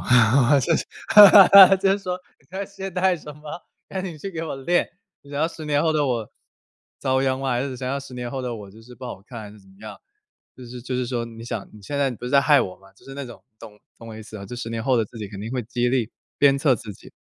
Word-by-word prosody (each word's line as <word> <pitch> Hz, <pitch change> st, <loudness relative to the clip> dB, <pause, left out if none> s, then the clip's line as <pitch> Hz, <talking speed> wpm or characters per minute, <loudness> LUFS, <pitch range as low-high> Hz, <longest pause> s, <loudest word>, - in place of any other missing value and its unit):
我 125 Hz, +3 st, +4 dB
就 165 Hz, +4 st, +1 dB
是 -, -, -4 dB, 1.0 s
就 195 Hz, -, +3 dB
是 200 Hz, -, -1 dB
说 180 Hz, -2 st, -4 dB, 0.2 s
你 140 Hz, -, -29 dB
在 195 Hz, +2 st, -4 dB
懈 195 Hz, 0 st, -8 dB
怠 185 Hz, 0 st, +1 dB
什 150 Hz, -2 st, -11 dB
么， 150 Hz, -, -19 dB, 0.5 s
赶 190 Hz, -, -5 dB
紧 175 Hz, -4 st, -7 dB
去 195 Hz, +6 st, -6 dB
给 165 Hz, -2 st, -5 dB
我 155 Hz, -, -5 dB
练， 175 Hz, +7 st, 0 dB, 0.3 s
你 140 Hz, -, -17 dB
要 150 Hz, +3 st, 0 dB
10 160 Hz, -2 st, -10 dB
年 145 Hz, -1 st, +1 dB
后 160 Hz, -1 st, +1 dB
的 150 Hz, -2 st, +1 dB
我 115 Hz, -4 st, -3 dB, 0.7 s
遭 130 Hz, 0 st, +1 dB
殃 130 Hz, 0 st, -1 dB
吗 135 Hz, -, -2 dB
还 120 Hz, +1 st, 0 dB
是 135 Hz, -2 st, -5 dB
想 125 Hz, 0 st, -5 dB
要 140 Hz, -, -2 dB
10 135 Hz, -2 st, -12 dB
年 125 Hz, -1 st, -6 dB
后 135 Hz, 0 st, -4 dB
的 125 Hz, -1 st, -4 dB
我 105 Hz, -3 st, -10 dB
就 110 Hz, +3 st, -16 dB
是 125 Hz, +2 st, -14 dB
不 130 Hz, -, -11 dB
好 120 Hz, -, -8 dB
看 115 Hz, +1 st, -10 dB
还 105 Hz, -, -10 dB
是 105 Hz, -, -16 dB
怎 95 Hz, -, -23 dB
么 95 Hz, -, -20 dB
样。 110 Hz, -, -10 dB, 0.6 s
就 130 Hz, -, -11 dB
是 125 Hz, +1 st, -9 dB
就 130 Hz, -, -5 dB
是 125 Hz, -1 st, -2 dB
说 120 Hz, -2 st, -3 dB
你 115 Hz, 0 st, -11 dB
想 115 Hz, -4 st, -6 dB
你 105 Hz, -, -14 dB
现 140 Hz, +8 st, -5 dB
在 140 Hz, -2 st, +1 dB
不 120 Hz, 0 st, -9 dB
是 -, -, -4 dB
在 140 Hz, -, +6 dB
害 145 Hz, -1 st, +4 dB
我 90 Hz, -, -5 dB
吗？ 95 Hz, 0 st, -21 dB
就 -, -, -25 dB
是 135 Hz, -, -10 dB
那 140 Hz, -1 st, -6 dB
种 120 Hz, -6 st, -13 dB, 0.2 s
懂 105 Hz, -2 st, -13 dB, 0.2 s
懂 115 Hz, 0 st, -12 dB
我 110 Hz, -, -9 dB
意 -, -, -9 dB
思 110 Hz, 0 st, -11 dB
吗， 100 Hz, -, -9 dB
就 125 Hz, -, -8 dB
10 120 Hz, -1 st, -6 dB
年 115 Hz, -1 st, -4 dB
后 130 Hz, 0 st, +2 dB
的 115 Hz, -, +2 dB
自 115 Hz, -, -14 dB
己 105 Hz, -2 st, -6 dB
肯 95 Hz, -1 st, -10 dB
定 110 Hz, -, -6 dB
会 125 Hz, -3 st, -3 dB
激 120 Hz, +2 st, -1 dB
励、 120 Hz, -3 st, -1 dB, 0.3 s
鞭 140 Hz, -1 st, +4 dB
策 140 Hz, -2 st, +2 dB
自 105 Hz, -2 st, -9 dB
己。 -, -, -17 dB
125 Hz, 300 characters per minute, -22 LUFS, 115-145 Hz, 1.0 s, 在